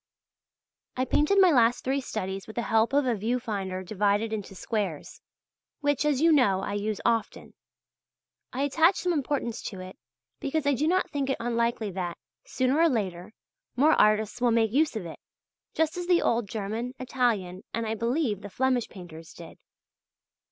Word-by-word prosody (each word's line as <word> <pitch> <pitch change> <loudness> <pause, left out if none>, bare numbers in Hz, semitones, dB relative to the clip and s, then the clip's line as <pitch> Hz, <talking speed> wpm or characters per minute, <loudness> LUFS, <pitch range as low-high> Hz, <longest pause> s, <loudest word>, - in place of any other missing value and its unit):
I 255 - +1
painted 300 +9 +2
my 375 -2 +7
last 240 -3 +3
three 270 +2 0
studies 195 -5 -5
with 220 - -10
the 235 - -1
help 225 +1 +2
of 285 0 +2
a 250 - +2
view 230 +4 -1
finder 195 -5 -4
divided 205 +3 0
into 205 -2 -5
squares{EE}, 195 -5 -4 0.6
which, 290 0 +1
as 290 -2 +1
you 330 +1 +5
know, 205 -11 +3
I 200 - -4 0.3
often 230 -1 0
use. - - -19 1.0
I 265 +3 -2
attach 325 +6 +4
some 360 -2 -1
importance 280 -5 -2
to 190 - -7
it, 185 0 -10 0.4
because 290 +2 -2
I 285 - +3
do 290 +4 0
not 370 +3 +1
think 280 -2 -2
it 270 - 0
unlikely 235 -2 -1
that, 175 -2 -4 0.3
sooner 260 +3 0
or 335 0 +5
later, 195 - -3 0.4
more 295 +5 +4
artists 215 +2 +2
will 245 - +4
make 225 -2 +2
use 300 +2 +2
of 210 -5 -4
it, 165 - -9 0.6
just 320 +1 +1
as 355 -1 -4
the 355 -1 +3
old 230 -3 0
German, 220 +5 -4
Italian, 230 -8 -1
and, 230 - -2
I 220 - -1
believe, 230 - -1
the 205 - -8
Flemish 255 +2 0
painters 165 -4 -11
did. - - -12
235 Hz, 175 wpm, -27 LUFS, 205-280 Hz, 1.0 s, my